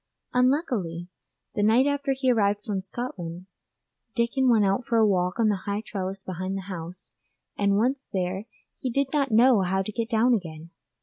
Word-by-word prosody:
Unluckily, 245 Hz, -, 0 dB, 0.4 s
the 210 Hz, -, -1 dB
night 225 Hz, +5 st, +4 dB
after 285 Hz, -1 st, 0 dB
he 260 Hz, -1 st, +1 dB
arrived 205 Hz, -3 st, +1 dB
from 200 Hz, -3 st, -2 dB
Scotland 185 Hz, -5 st, -6 dB, 0.7 s
Dickon 250 Hz, +3 st, +2 dB
went 220 Hz, -4 st, +4 dB
out 195 Hz, +6 st, +1 dB
for 235 Hz, -1 st, 0 dB
a 220 Hz, -, +5 dB
walk 180 Hz, 0 st, +1 dB
on 220 Hz, -2 st, +4 dB
the 200 Hz, -3 st, -1 dB
high 200 Hz, +1 st, -1 dB
trellis 195 Hz, -2 st, -4 dB
behind 185 Hz, +1 st, -4 dB
the -, -, -4 dB
house, 180 Hz, -1 st, -7 dB, 0.4 s
and 200 Hz, 0 st, +2 dB
once 260 Hz, +5 st, 0 dB
there 190 Hz, +3 st, -2 dB, 0.3 s
did 270 Hz, +2 st, -1 dB
not 280 Hz, -2 st, +2 dB
know 235 Hz, 0 st, +5 dB
how 190 Hz, +1 st, 0 dB
to 215 Hz, -, -5 dB
get 230 Hz, +1 st, -3 dB
down 235 Hz, +2 st, +3 dB
again. 165 Hz, -5 st, -4 dB
210 Hz, 175 wpm, -26 LUFS, 185-245 Hz, 0.7 s, a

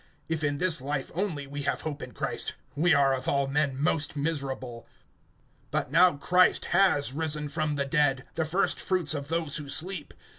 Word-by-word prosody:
(19)If 160 Hz, -1 st, -1 dB
in 145 Hz, -1 st, 0 dB
this 165 Hz, -3 st, +2 dB
life 135 Hz, 0 st, -3 dB
only 170 Hz, -6 st, -2 dB
we 145 Hz, +1 st, -6 dB
have 140 Hz, 0 st, -1 dB
hope 150 Hz, -2 st, -5 dB
in -, -, -7 dB
Christ, -, -, -2 dB, 0.2 s
we 170 Hz, +5 st, +3 dB
are 140 Hz, -2 st, +4 dB
of 130 Hz, -1 st, -4 dB
all 140 Hz, 0 st, +2 dB
men 140 Hz, -1 st, 0 dB
most 150 Hz, 0 st, 0 dB
miserable. 135 Hz, -6 st, -4 dB, 0.8 s
(20)But -, -, -2 dB
now 175 Hz, +3 st, +6 dB
Christ 180 Hz, +6 st, +3 dB
has 175 Hz, -8 st, +3 dB
risen 150 Hz, -1 st, -2 dB
from 150 Hz, 0 st, -2 dB
the 140 Hz, -1 st, -1 dB
dead, 135 Hz, -2 st, +1 dB
the 160 Hz, -, 0 dB
first 175 Hz, +5 st, 0 dB
fruits 180 Hz, -6 st, +1 dB
of 140 Hz, -2 st, -4 dB
those 160 Hz, -2 st, -1 dB
who 145 Hz, -2 st, -6 dB
sleep. 170 Hz, +1 st, -1 dB
150 Hz, 185 wpm, -28 LUFS, 140-165 Hz, 0.8 s, now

